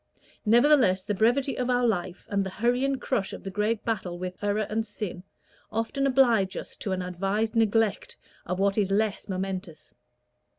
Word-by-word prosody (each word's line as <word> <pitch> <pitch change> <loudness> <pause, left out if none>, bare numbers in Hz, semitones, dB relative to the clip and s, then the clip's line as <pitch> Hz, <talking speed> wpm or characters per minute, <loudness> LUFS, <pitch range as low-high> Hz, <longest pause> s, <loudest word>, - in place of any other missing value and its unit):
Nevertheless, 235 -5 +5
the 205 - -2
brevity 245 +7 +2
of 250 0 -1
our 245 0 +2
life, 185 -5 -2
and 200 -1 0
the 190 - -4
hurry 240 +6 0
and 275 -1 0
crush 215 -7 -1
of - - -8
the 195 - -5
great 210 +2 -1
battle 190 -6 -2
with 185 +2 -6
error 205 +1 +1
and 220 +1 -1
sin, 205 -4 -6 0.5
often 230 +5 0
oblige 240 -8 +3
us - - -6
to 200 - -4
an 185 -1 -1
advised 195 +5 -1
neglect 225 -1 +1 0.3
of 180 +1 -2
what 195 +2 +2
is 200 -2 +1
less 210 +1 0
momentous. 185 -3 -5
210 Hz, 175 wpm, -27 LUFS, 190-230 Hz, 0.5 s, Nevertheless